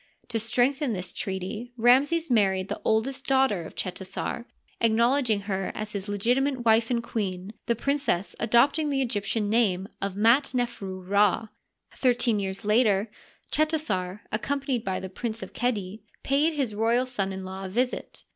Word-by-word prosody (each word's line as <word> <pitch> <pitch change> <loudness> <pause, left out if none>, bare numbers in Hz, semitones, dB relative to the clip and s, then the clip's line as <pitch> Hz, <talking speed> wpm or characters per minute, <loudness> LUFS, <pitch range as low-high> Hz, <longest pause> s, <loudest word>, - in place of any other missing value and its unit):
To 230 -2 -1
strengthen 245 +4 +1
this 180 -3 -4
treaty 200 +5 -4
Ramses 275 +7 +4
married 195 -4 +2
the - - -4
oldest 260 +5 0
daughter 265 -8 +3
of - - -10
Chetasar, 190 +5 -4 0.3
acknowledging 230 0 +3
her 195 -1 -2
as 215 0 -4
his 200 -1 -5
legitimate 245 +5 +1
wife 225 0 +4
and 235 -2 0
queen, 195 -4 -4
the 235 - +2
princess 275 -7 0
adopting 265 +7 +3
the 270 -2 +1
Egyp 205 -4 -2
tian 215 -3 0
name 200 -4 +2
Mdi 225 +8 +2
nefru 205 -7 -3
Rd. 205 +2 +2 0.5
Thirteen 245 -4 +3
years 195 +1 -4
later 210 -1 +3 0.4
Cheta 310 +1 +2
sar, 190 -8 -3
accompanied 270 +2 -1
by 190 -1 -2
the 190 - -6
Prince 220 +4 -5
of - - -10
Qedi, 215 -4 -2 0.2
paid 290 +4 +2
his 270 -8 -1
royal 230 +4 +2
son 205 -7 -2
in 190 0 -5
law 190 +1 -6
a - - -5
visit. 250 +6 -2
225 Hz, 155 wpm, -26 LUFS, 195-255 Hz, 0.5 s, Ramses